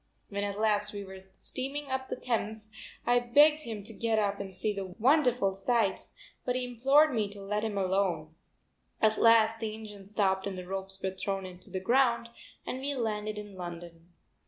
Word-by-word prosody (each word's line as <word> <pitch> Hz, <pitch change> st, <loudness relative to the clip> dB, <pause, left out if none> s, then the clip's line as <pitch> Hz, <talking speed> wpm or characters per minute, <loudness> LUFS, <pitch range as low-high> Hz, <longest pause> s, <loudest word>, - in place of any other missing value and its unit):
When 200 Hz, 0 st, -2 dB
at 200 Hz, 0 st, -3 dB
last 210 Hz, -1 st, +1 dB
we 205 Hz, -1 st, -5 dB
were 190 Hz, -1 st, -9 dB, 0.2 s
steaming 275 Hz, +5 st, -3 dB
up 260 Hz, 0 st, -1 dB
the -, -, -2 dB
Thames 220 Hz, -2 st, -3 dB, 0.3 s
I 245 Hz, 0 st, +4 dB
begged 295 Hz, +6 st, +5 dB
him 220 Hz, -3 st, -5 dB
to 225 Hz, +3 st, -6 dB
get 225 Hz, 0 st, 0 dB
up 200 Hz, -1 st, +1 dB
and 195 Hz, -2 st, -6 dB
see 210 Hz, +3 st, -1 dB
the 190 Hz, -2 st, -6 dB
wonderful 250 Hz, -5 st, +3 dB
sights, 200 Hz, 0 st, 0 dB, 0.3 s
but 250 Hz, -, -1 dB
he 255 Hz, 0 st, 0 dB
implored 270 Hz, +5 st, +4 dB
me 215 Hz, -3 st, 0 dB
to 200 Hz, 0 st, -11 dB
let 210 Hz, +2 st, -2 dB
him 215 Hz, -2 st, -2 dB
alone. 185 Hz, -5 st, 0 dB, 0.7 s
At 220 Hz, 0 st, +3 dB
last 225 Hz, -1 st, +6 dB
the 220 Hz, -2 st, -3 dB
engine 210 Hz, -3 st, -10 dB
stopped 195 Hz, -2 st, +1 dB
and 190 Hz, -2 st, -4 dB
the 180 Hz, -, -6 dB
ropes 190 Hz, +1 st, -5 dB
were 190 Hz, -, 0 dB
thrown 190 Hz, -1 st, -4 dB
to 190 Hz, -, -12 dB
the 190 Hz, 0 st, -3 dB
ground, 235 Hz, +3 st, +2 dB, 0.4 s
and 255 Hz, -, -3 dB
we 280 Hz, +1 st, -2 dB
landed 215 Hz, -3 st, -2 dB
in 205 Hz, -1 st, -7 dB
London. 170 Hz, -1 st, -8 dB
210 Hz, 190 wpm, -30 LUFS, 195-235 Hz, 0.7 s, last